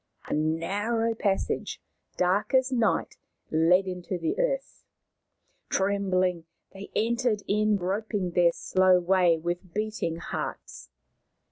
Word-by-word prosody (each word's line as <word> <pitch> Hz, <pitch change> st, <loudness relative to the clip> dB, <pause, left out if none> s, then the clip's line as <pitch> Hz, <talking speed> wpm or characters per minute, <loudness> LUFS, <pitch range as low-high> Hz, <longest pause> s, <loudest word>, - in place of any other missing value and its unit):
A -, -, -4 dB
narrow 200 Hz, +9 st, 0 dB
passage, 200 Hz, -3 st, -1 dB, 0.4 s
dark 185 Hz, +8 st, +1 dB
as 260 Hz, 0 st, +3 dB
night, 235 Hz, -3 st, 0 dB, 0.3 s
led 170 Hz, +4 st, +4 dB
into 180 Hz, 0 st, -4 dB
the 165 Hz, -2 st, -2 dB
earth. -, -, -2 dB, 0.9 s
Trembling, 185 Hz, -3 st, 0 dB, 0.3 s
they 195 Hz, +1 st, -10 dB
entered 230 Hz, -1 st, +1 dB
in, 210 Hz, +1 st, +2 dB
groping 195 Hz, 0 st, -2 dB
their 170 Hz, 0 st, +4 dB
slow 185 Hz, +1 st, +3 dB
way 180 Hz, -2 st, +3 dB
with 175 Hz, +2 st, -5 dB
beating 215 Hz, -6 st, -2 dB
hearts. 165 Hz, -, -6 dB
190 Hz, 110 wpm, -27 LUFS, 175-215 Hz, 0.9 s, led